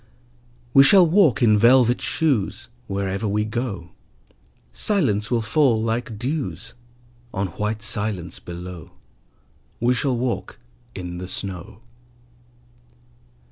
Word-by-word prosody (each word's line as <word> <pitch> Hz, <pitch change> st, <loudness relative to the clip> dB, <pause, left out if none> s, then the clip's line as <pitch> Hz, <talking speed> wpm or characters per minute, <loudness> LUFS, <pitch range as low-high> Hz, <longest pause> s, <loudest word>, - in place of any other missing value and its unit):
We 135 Hz, -, +8 dB
shall 180 Hz, +6 st, +7 dB
walk 160 Hz, -, +4 dB
in 105 Hz, -2 st, +5 dB
velvet 120 Hz, +1 st, +5 dB
shoes: 135 Hz, -13 st, -1 dB, 0.2 s
Wherever 100 Hz, +1 st, -2 dB
we 105 Hz, +1 st, 0 dB
go 110 Hz, -7 st, -4 dB, 0.8 s
Silence 120 Hz, -, 0 dB
will 120 Hz, -2 st, +1 dB
fall 115 Hz, +1 st, +2 dB
like 115 Hz, 0 st, -2 dB
dews 135 Hz, +6 st, -4 dB, 0.6 s
On 95 Hz, 0 st, -1 dB
white 105 Hz, +4 st, -3 dB
silence 105 Hz, -4 st, -4 dB
below. 90 Hz, -2 st, -9 dB, 0.9 s
We 120 Hz, +2 st, +2 dB
shall 125 Hz, 0 st, 0 dB
walk 125 Hz, 0 st, -3 dB, 0.4 s
in 90 Hz, -1 st, -6 dB
the 90 Hz, -, -6 dB
snow. 95 Hz, +1 st, -6 dB
110 Hz, 105 wpm, -22 LUFS, 100-125 Hz, 0.9 s, We